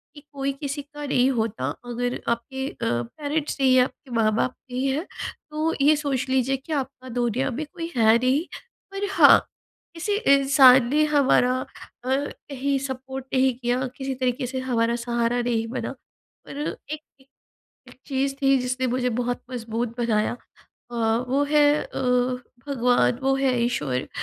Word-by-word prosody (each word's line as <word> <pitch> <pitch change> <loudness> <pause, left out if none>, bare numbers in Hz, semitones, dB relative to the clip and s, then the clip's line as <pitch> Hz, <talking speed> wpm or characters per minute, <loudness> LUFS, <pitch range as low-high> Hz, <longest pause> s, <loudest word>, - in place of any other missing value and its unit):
कि, 290 - -11
कोई 275 0 -1
किसी 285 +1 -4
का 295 +1 -9
नहीं 260 -2 +3
होता 225 -3 -2 0.2
अगर 245 +1 -2
आपके 265 +3 -2
अ, - - -11
पेरेंट्स 285 - -2
नहीं 265 -1 +4
हैं 255 - +6
आपके 260 +1 -8
माँ-बाप 225 +3 +2 0.2
नहीं 255 +2 -1
हैं 285 +6 -1 0.5
तो 310 +2 0
ये 300 +2 +6
सोच 280 -4 -1
लीजिए 265 +1 +1
कि 270 +5 -7
आपका 265 -2 -4
दुनिया 245 +2 0
में 285 +6 -4
कोई 335 +1 -7
है 225 -1 +5
नहीं। 260 +6 +1 0.5
पर 395 +1 -3
हाँ - - +8 0.5
किसी 345 +5 -2 0.2
इंसान 270 -2 +6
ने 300 +3 +3
हमारा 265 -4 +3
अ, - - -5 0.4
कहीं 275 +1 -2
सपोर्ट 265 0 -6
नहीं 260 0 +3
किया, 250 +1 0
किसी 270 0 -3
तरीके 255 0 -1
से 260 +1 -3
हमारा 235 -2 0
सहारा 235 0 0
नहीं 230 -2 -1
बना 235 - -4 0.5
और 280 - -7 0.3
एक 305 0 -4 0.2
एक 265 - -24 0.6
एक - - -17
चीज़ 275 0 -1
थी 270 0 +4
जिसने 255 +1 -1
मुझे 250 0 0
बहुत 245 0 -2
मज़बूत 235 -1 -4
बनाया 220 -3 +1 0.6
अ, - - -6 0.3
वो 275 +3 +2
है 300 -1 +5 0.2
अ, - - -9 0.7
भगवान 250 -3 +2
वो 270 0 +2
है 270 -1 +1
ईश्वर 145 - -1
260 Hz, 160 wpm, -24 LUFS, 245-275 Hz, 0.7 s, हाँ